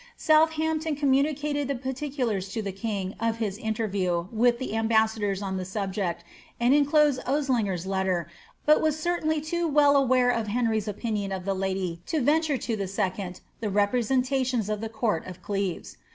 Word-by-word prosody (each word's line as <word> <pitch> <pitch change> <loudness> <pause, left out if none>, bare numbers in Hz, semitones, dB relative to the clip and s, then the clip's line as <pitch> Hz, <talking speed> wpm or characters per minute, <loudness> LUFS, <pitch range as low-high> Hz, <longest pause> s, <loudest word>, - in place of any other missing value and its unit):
^ - - -20
Southampton 315 0 +2
communicated 290 +1 +1
the 280 - -1
parti 265 +3 -4
culars 220 -9 -2
to 225 - -3
the 200 - -3
king 195 -1 -3
of 230 0 0
his 210 -3 -3
interview 195 -6 -1
with 240 +1 +3
tiie 260 -3 -4
ambassadors 220 -3 +1
on 190 -1 -2
the 185 - -3
subject, 190 -2 -3 0.4
tod 240 +2 +4
inclosed 290 -1 +4
Osliger's 245 - 0
letter, 190 -3 0 0.4
but 305 0 +5
was 310 -1 +1
certainly 315 -2 0
too 335 +3 -1
well 290 -1 +5
aware 255 -2 +4
of 230 -3 -1
Henry's 220 -1 0
opinion 210 -1 -2
of 190 -1 -4
the 195 - 0
lady 190 -3 -2
to 320 - 0
venture 295 +1 +2
to 220 -6 -3
second 185 -1 -3 0.2
the 220 - -2
representations 250 +3 +1
of 210 - -1
tiie 220 0 -5
court 220 -6 0
of 185 -1 -8
Cieves. 200 -3 -3
225 Hz, 165 wpm, -26 LUFS, 195-280 Hz, 0.4 s, but